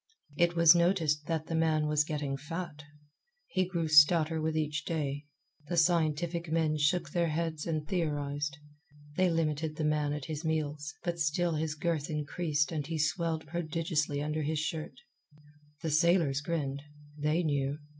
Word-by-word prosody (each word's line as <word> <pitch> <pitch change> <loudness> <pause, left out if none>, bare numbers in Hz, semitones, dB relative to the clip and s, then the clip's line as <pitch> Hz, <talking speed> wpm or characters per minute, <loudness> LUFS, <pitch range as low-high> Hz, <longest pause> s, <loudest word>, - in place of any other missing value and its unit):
It 175 +2 +2
was 170 -1 +8
noticed 170 -4 +2
that 160 -2 -1
the 165 - -5
man 160 -1 +2
was 150 0 +2
getting 150 -2 -3
fat. 155 +1 -6 0.6
He 185 -1 0
grew 170 -3 -1
stouter 155 +1 +5
with 160 0 -1
each 150 0 -1
day. 145 -3 -3 0.4
The 175 - -2
scientific 165 0 +1
men 160 -2 +1
shook 160 +1 +1
their 170 0 +1
heads 160 0 -2
and 155 -2 -2
theorized. 145 -4 -2 0.6
They 185 +2 +3
limited 160 -2 -1
the 155 - -3
man 150 -1 +1
at 145 -2 -4
his 155 0 -5
meals, 155 -1 -2
but 170 -1 -2
still 165 +2 +1
his 155 0 -2
girth 160 -2 -1
increased 150 0 -1
and 150 -3 -3
he 165 -1 -3
swelled 160 +1 0
prodigiously 160 -3 -1
under 150 +1 -2
his 155 +1 -1
shirt. 155 -2 -3 0.9
The 160 - -1
sailors 160 -3 +3
grinned. 145 -4 -2 0.3
They 150 +3 0
knew. 140 -2 0
155 Hz, 155 wpm, -31 LUFS, 150-165 Hz, 0.9 s, was